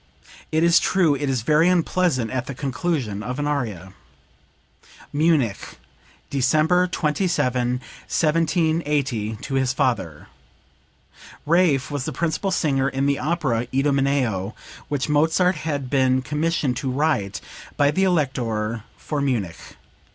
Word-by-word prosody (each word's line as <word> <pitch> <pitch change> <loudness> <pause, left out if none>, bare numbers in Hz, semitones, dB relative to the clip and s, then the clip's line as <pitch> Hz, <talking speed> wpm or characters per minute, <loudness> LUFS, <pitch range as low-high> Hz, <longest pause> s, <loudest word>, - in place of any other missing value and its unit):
It 160 +1 +2
is 170 0 +6
true 175 -6 +2
it 140 0 -2
is 130 -4 -1
very 155 +7 +4
unpleasant 170 -8 +1
at 130 0 -3
the 140 - -5
conclusion 135 - -2
of 125 +4 -4
an 145 - -2
aria." 110 - -3 1.2
(Munich, 145 - +1 0.5
December 155 +7 +3
27, 150 -8 0
1780, 150 - 0
to 140 - -5
his 130 -2 +1
father. 95 - -1 1.2
Raaff 155 -5 +2
was 145 -3 -3
the - - -3
principal 170 +4 -1
singer 140 -7 +1
in 135 +1 -1
the 140 0 +1
opera 135 -6 -1
"Idomeneo," 135 -7 0 0.3
which 140 -2 -2
Mozart 160 +4 +2
had 145 -4 -3
been 130 -1 +2
commissioned 150 -2 -1
to 135 - -2
write 130 -8 0 0.4
by 145 0 +4
the 190 +5 +1
Elector 115 - 0
for 150 -2 -3
Munich. 115 -11 -3
140 Hz, 120 wpm, -22 LUFS, 125-160 Hz, 1.2 s, is